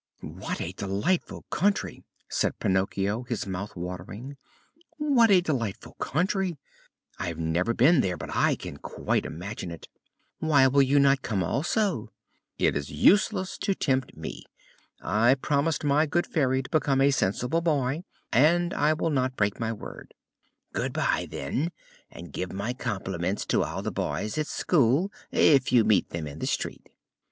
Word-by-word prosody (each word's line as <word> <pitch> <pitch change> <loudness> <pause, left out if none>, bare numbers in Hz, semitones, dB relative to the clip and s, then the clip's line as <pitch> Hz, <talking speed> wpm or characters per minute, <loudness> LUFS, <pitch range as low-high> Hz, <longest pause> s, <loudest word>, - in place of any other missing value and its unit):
"What - - -5
a 85 - -3
delightful 100 - -2
country!" 195 - 0 0.2
said - - -1
Pinocchio, 100 +3 0
his 120 -3 -3
mouth 100 +2 -5
watering. 90 +9 -7 0.6
"What 275 -7 +4
a 190 -3 +6
delightful 120 - -3
country! 180 +2 0 0.6
I - - -2
have 85 -2 -4
never 85 +7 0
been 140 +5 +5
there, 90 -5 -1
but - - -6
I - - +3
can - - -8
quite - - -2
imagine 90 +3 -6
it." 85 -2 -9 0.5
"Why 145 -4 +4
will 140 +2 +4
you 135 +1 +3
not 140 -1 +4
come 100 -6 -1
also?" 155 - 0 0.5
"It - - +2
is 70 -1 -3
useless 190 - +3
to 195 - 0
tempt 130 -5 -1
me. - - -7 0.6
I 110 +8 +4
promised 145 +3 0
my 150 +2 +3
good 175 +4 +1
Fairy 130 -4 +1
to - - -10
become 140 -3 +2
a 140 +1 +5
sensible 125 +7 0
boy, 150 -1 0 0.3
and 170 +7 +4
I 150 +1 +3
will 160 +1 -1
not 130 -2 0
break 100 -1 0
my 115 -1 -1
word." 110 - -9 0.6
"Good - - -2
bye, - - 0
then, 135 - -2 0.4
and 85 -3 -11
give 90 - -3
my 100 +5 -3
compliments 95 -5 -3
to - - +2
all - - -4
the - - -2
boys 110 +8 -2
at 155 - -1
school, 155 - +2 0.2
if 135 -4 +4
you 120 -3 +6
meet 105 -3 +3
them 85 -2 -4
in 75 +1 -8
the - - -2
street." - - -3
130 Hz, 160 wpm, -27 LUFS, 100-155 Hz, 0.6 s, a